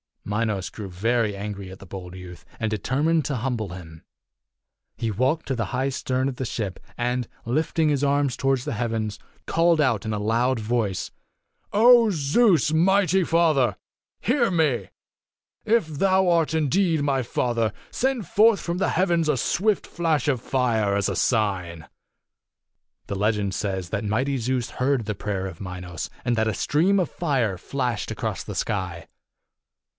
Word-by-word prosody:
Minos 105 -2 -1
grew 105 -3 -7
very 110 +3 0
angry 100 -1 -6
at 95 - -11
the - - -12
bold 90 -1 -8
youth, 90 -3 -10
and 110 -1 -1
determined 145 +9 +1
to 140 - -1
humble 115 -4 -2
him. 80 -2 -10 0.9
He 115 - -2
walked 130 - 0
to 135 - -1
the 115 -2 -1
high 130 +2 +1
stern 130 0 -1
of 130 - -7
the 130 - -3
ship, 110 -6 -4 0.2
and, 125 0 -1 0.2
lifting 155 +5 +1
up - - +3
his 145 -1 0
arms 140 -2 +1
toward 135 -1 +1
the 120 - -4
heavens, 110 -2 -2 0.3
called 165 -1 +3
out 115 -8 +1
in 110 - -2
a 105 - -2
loud 115 +4 +1
voice, 110 -3 -1 0.6
"O 235 +1 +7
Zeus, 160 - +3
mighty 190 +2 +3
father! 155 -10 +3 0.5
Hear 240 -5 +2
me! 160 -8 +1 0.8
If 225 -2 +3
thou 190 +4 +2
art 165 -2 +2
indeed 160 +1 +2
my 140 -2 +1
father, 115 -2 0 0.2
send 260 -5 0
forth 220 +1 +4
from 170 0 -3
the 195 - +1
heavens 170 -2 +1
a 150 -3 +2
swift 200 - +1
flash 160 -5 0
of 130 -5 +1
fire 115 -6 +1
as 100 0 +1
a - - -2
sign." 90 -8 0 1.2
The 100 - -3
legend 105 -1 0
says 95 -3 -3
that 105 +1 -2
mighty 130 +7 0
Zeus 125 0 -1
heard 130 -3 0
the 105 - -2
prayer 95 -1 -3
of 90 -4 -7
Minos, 90 -2 -6
and 120 -1 +1
that 110 0 +2
a 110 - 0
stream 180 - +2
of 180 - -1
fire 135 - 0
flashed 125 +2 -2
across - - -3
the - - -7
sky. 90 -5 -3
125 Hz, 165 wpm, -24 LUFS, 105-160 Hz, 1.2 s, O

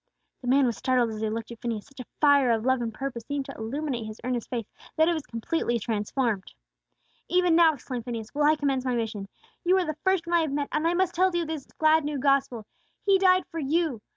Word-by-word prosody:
The 250 - -7
man 270 +2 +4
was 235 -2 -1
startled 250 -3 +1
as 215 0 -6
he 220 - 0
looked 225 +1 -5
at 235 - -10
Phineas; 225 -3 -3
such 275 -1 -18
a 255 - -8
fire 285 -3 +5
of 225 -1 +1
love 260 -1 +2
and 230 -1 -2
purpose 240 0 -5
seemed 285 -1 -2
to - - -8
illuminate 240 0 -3
his 215 0 -9
earnest 245 -2 -2
face 235 -3 -3 0.3
that 315 +1 +4
it 345 - +3
was 315 -3 -4
completely 235 +1 -1
transformed. 215 -1 -2 0.7
"Even 360 -2 +3
now," 325 -2 +6
exclaimed 250 -3 -6
Phineas, 225 -3 -6
"will 295 - -2
I 300 +1 +5
commence 275 -3 0
my 255 -2 0
mission. 220 -4 -3 0.4
You 370 +1 +4
are 370 - +1
the 310 -2 -4
first 380 -3 +2
one 340 0 +2
I - - +3
have 315 -3 -1
met, 285 0 -2
and 305 +2 +1
I 345 - +1
must 370 0 +1
tell 370 +2 +3
to 345 - -1
you 340 - 0
this 310 -3 -5
glad 315 0 +4
new 295 0 -2
gospel. 270 -5 +1 0.4
He 395 -1 +4
died 370 -1 +4
for 330 - -4
you! 300 -4 0
275 Hz, 245 wpm, -26 LUFS, 235-320 Hz, 0.7 s, now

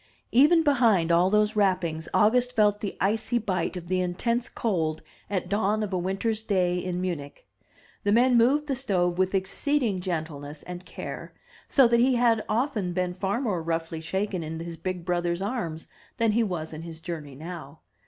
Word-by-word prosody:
Even 305 +6 +6
behind 230 - +3
all 175 +2 +4
those 210 +1 +2
wrappings 185 -6 0
August 245 +3 +3
felt 210 -1 +3
the 205 - -5
icy 220 +5 +1
bite 185 -5 -1
of 175 -1 -8
the 185 +1 +1
intense 230 +7 -1
cold 160 -8 -1 0.3
at 195 -3 -2
dawn 210 +1 +1
of 200 -2 -4
a 180 - 0
winter^s 200 +4 -1
day 180 -3 +2
in 180 0 -3
Munich. 150 - -5 0.6
The 205 - +2
men 245 +3 +4
moved 265 +6 +4
the 280 - 0
stove 185 -9 0
with 185 +1 +2
exceeding 215 +3 0
gentleness 155 -5 -5
and 180 0 -8
care, - - -7 0.3
so 270 -4 +5
that 235 0 +3
he 255 +1 +4
had 235 -2 +3
often 215 -6 0
been 180 0 -1
far 195 +4 -1
more 210 -10 -1
roughly 165 0 -3
shaken 190 +2 -2
in 160 0 -5
his 170 0 -6
big 180 +1 -4
brothers' 175 -1 0
arms 190 -7 -3 0.3
than 230 -2 +2
he 230 +3 +2
was 175 -7 -3
in 155 - -7
his 165 -1 -8
journey 160 -5 -6
now. 160 -1 -9
185 Hz, 180 wpm, -26 LUFS, 170-225 Hz, 0.6 s, Even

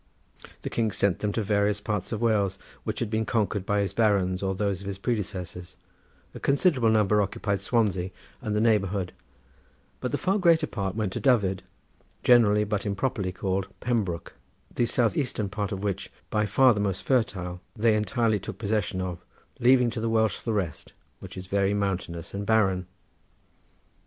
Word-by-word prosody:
The - - -3
king 115 -2 +1
sent 100 -2 0
them 105 - -1
to 110 - 0
various 100 0 +1
parts 105 -2 -3
of 110 0 -2
Wales 100 -4 +2 0.3
which - - -3
had 115 -3 -2
been 110 0 +1
conquered 105 -3 -1
by 105 0 +2
his 100 -3 -2
barons 100 -5 +2
or 95 -1 -1
those 100 -1 -1
of 100 - -8
his 100 -1 -4
predecessors: 95 -5 -4 0.6
a - - -8
considerable 140 -4 +3
number 105 -1 +3
occupied 100 0 -1
Swansea 100 -4 +1 0.3
and 105 -3 -2
the 105 - +2
neighbourhood; 100 -4 +1 0.9
but - - -2
far 190 - +1
the - - -2
greater 165 -3 +4
part 100 -8 -3
went 105 -4 -1
to - - -2
Dyfed, 100 -9 +3 0.6
generally 105 -4 +5
but 105 -1 -2
improperly 100 -1 -1
called 95 0 -2
Pembroke, 105 -9 -2 0.4
the 120 - +1
south 115 -2 +2
eastern 115 -7 -1
part 100 0 -3
of 95 0 -4
which, 100 -2 -2 0.2
by 105 -1 +1
far 130 +5 +5
the 105 - -3
most 100 -2 -1
fertile, 95 -9 0
they 110 -1 +3
entirely 110 +1 +1
took - - -7
possession 100 -4 -1
of, 90 -2 -5 0.4
leaving 125 -1 +5
to 115 - -4
the 115 - 0
Welsh 110 -1 +1
the 115 - -2
rest, 95 -8 -3 0.3
which - - -10
is 95 - -6
very 100 +1 +1
mountainous 90 -4 -3
and 100 +1 -4
barren. 95 -5 +2
105 Hz, 175 wpm, -27 LUFS, 95-115 Hz, 0.9 s, generally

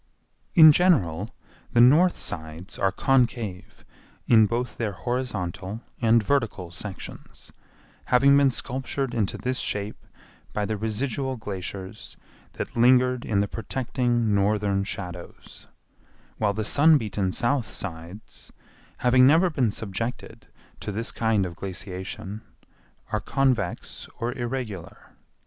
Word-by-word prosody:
In 160 -3 +10
general, 110 - +2 0.4
the 120 - +4
north 150 +9 +6
sides 80 +3 -6
are 95 - +2
concave 115 -5 -1 0.4
in 110 -3 +6
both 120 +3 -3
their 110 -4 -2
horizontal 105 -1 -4 0.2
and 115 -1 +4
vertical 110 -9 -1
sections, 95 +2 -9 0.5
having 135 +2 +5
been 140 -1 +5
sculptured 130 +1 -3
into 110 -5 -1
this 130 0 -2
shape 105 +1 -3 0.5
by 105 - -1
the 110 - -2
residual 125 +5 -2
glaciers 95 -1 -7 0.4
that - - -6
lingered 125 +1 +4
in 100 -2 +1
the 100 - 0
protecting 120 -1 -1
northern 100 0 +1
shadows, 90 -3 -8 0.7
while 105 -2 +1
the 110 0 -2
sun 155 +7 +6
beaten 100 -6 -2
south 120 +4 0
sides, 90 +3 -7 0.5
having 125 +1 +6
never 170 +5 +4
been 130 -7 +1
subjected 115 +3 -5 0.3
to - - -5
this 115 +3 -2
kind 110 -4 +1
of 85 -2 -6
glaciation, 95 +2 -5 0.7
are - - 0
convex 130 -9 -1
or 120 +1 -2
irregular. 120 -8 -6
110 Hz, 120 wpm, -25 LUFS, 100-125 Hz, 0.7 s, In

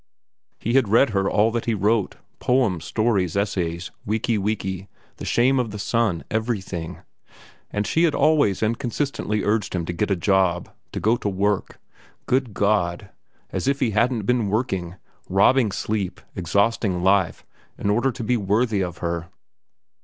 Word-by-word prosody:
He 115 - -2
had 130 -4 +4
read 115 +5 +4
her 95 -1 +1
all 110 +2 +3
that 120 0 -2
he 115 - +1
wrote—poems, 105 0 0
stories, 100 -6 0
essays—"Wiki 100 +4 -2
Wiki," 100 -2 -2 0.3
"The - - -7
Shame 130 +3 +3
of 120 -3 -1
the 105 - -6
Sun," 105 -4 0
everything. 95 -7 -3 0.7
And 105 0 -2
she 165 +9 +2
had 160 - +1
always 145 -11 +3
and 110 +1 0
consistently 125 -5 -2
urged 105 -2 0
him 85 -2 -2
to 90 - -3
get 105 +5 -1
a 100 - +2
job, 90 -1 +1 0.2
to - - -2
go 115 +3 +2
to 105 - -2
work—good 105 +4 -2
God!—as 100 +2 -2
if 140 0 +1
he 115 - +1
hadn't 115 +1 +1
been 120 -3 +1
working, 95 -5 -1 0.3
robbing 105 +4 +4
sleep, 100 -2 -2 0.2
exhausting 100 +1 +1
life, 95 -2 +2 0.3
in 100 - 0
order 120 +5 +2
to 120 0 -6
be 120 +2 +1
worthy 105 +1 +1
of 90 -2 -5
her. 85 0 -3
105 Hz, 150 wpm, -23 LUFS, 95-115 Hz, 0.7 s, had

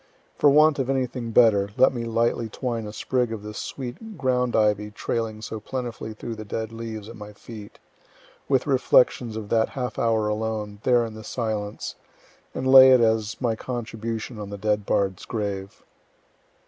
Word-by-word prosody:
For 145 - +5
want 150 +1 +5
of 130 -1 -1
anything 125 -3 -1
better, 110 -4 +4
let 130 - +5
me 120 -2 -4
lightly 115 0 0
twine 115 -2 -3
a - - -6
sprig 125 +2 -1
of 110 -2 -5
the 105 0 -7
sweet 135 - -7
ground 125 -3 0
ivy 105 -1 +2
trailing 110 +1 -3
so 110 0 -5
plentifully 120 -1 -5
through 115 +2 -6
the 110 - -6
dead 110 +1 -4
leaves 115 -2 -7
at 115 - -10
my 105 -1 -10
feet, 105 0 -11 0.7
with 135 -2 +2
reflections 125 -4 +3
of 105 -2 -6
that 110 -1 +2
half 125 -5 -4
hour 110 -2 +1
alone, 105 -1 -3
there 120 -1 +3
in 110 - -7
the 110 0 -10
silence, 105 -3 -4 0.6
and 130 - -3
lay 130 0 +9
it 130 - +6
as 110 -2 +1
my 120 -3 0
contribution 115 -1 -5
on 105 -1 -6
the 100 - -6
dead 105 0 -1
bard's 95 -2 0
grave. 100 -3 -5
115 Hz, 175 wpm, -24 LUFS, 105-125 Hz, 0.7 s, lay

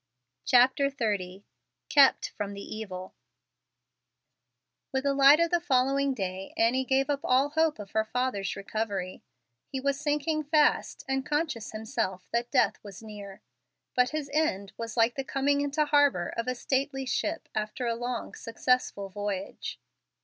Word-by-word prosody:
CHAPTER 260 +3 +4
XXX 200 -7 -3 0.4
KEPT 280 -2 +5
FROM 205 -1 -5
THE 200 +2 -7
EVIL 185 -3 -7 1.8
With 265 0 -1
the 280 0 +2
light 275 +2 +7
of 335 0 +2
the 345 - +3
following 275 -3 +2
day 190 -2 -5
Annie 250 +3 +2
gave 270 +1 +2
up 290 -1 0
all 270 -2 +3
hope 315 +1 +1
of 205 -2 -9
her 220 - +2
father's 230 -4 -2
recovery. 200 -2 -4 0.5
He 265 - -4
was 280 +1 0
sinking 300 +1 0
fast, 300 0 +2
and 270 0 0
conscious 295 -8 -2
himself 215 -4 -3
that 235 +1 -1
death 255 - +2
was 205 +1 -10
near. 205 -3 -9 0.5
But 250 0 +3
his 295 -1 -4
end 200 -11 0
was 230 0 -6
like 230 +1 +4
the 270 - -3
coming 280 +1 +1
into 285 +1 +1
harbor 285 -12 +3
of 230 +1 -3
a 255 - 0
stately 270 +2 -1
ship 315 +5 -2
after 215 +3 -3
a 235 - +1
long, 240 +2 -4
successful 230 -3 -1
voyage. 200 -1 -5
250 Hz, 150 wpm, -28 LUFS, 210-280 Hz, 1.8 s, light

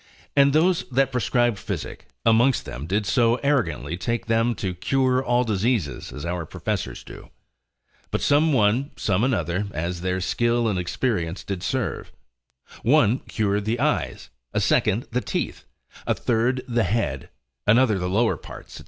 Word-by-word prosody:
And 140 0 +5
those 170 +4 +3
that 135 +1 +2
prescribed 120 -3 +1
physic, - - -6 0.2
amongst 115 +3 +4
them, 65 +6 -6
did 100 +4 0
not - - -11
so 115 0 +3
arrogantly 85 - 0
take 115 +6 -1
upon 115 - -19
them 115 +1 +2
to 95 -3 -3
cure 130 +7 +1
all 125 -1 +2
diseases, 105 - -1
as 75 - -7
our 85 0 -2
professors - - -4
do, - - -12 0.8
but - - -1
some 150 +3 +3
one, 125 +2 +2
some 100 +1 +1
another, 100 - 0
as 85 +3 -3
their 90 0 -1
skill 120 +5 +1
and 100 -4 0
experience 90 -1 -2
did 95 -3 -4
serve; 125 +4 -2 0.7
One 125 -2 +4
cured 105 -1 0
the 115 +2 -1
eyes, 150 +3 -1 0.2
a - - +1
second 110 +6 +2
the 125 +2 0
teeth, - - -3 0.4
a - - +2
third 125 +2 0
the 120 -1 +1
head, 90 - -1 0.4
another 110 -2 +4
the 90 0 -2
lower 105 -2 +2
parts, - - -11
&c. - - -9
115 Hz, 160 wpm, -24 LUFS, 95-125 Hz, 0.8 s, And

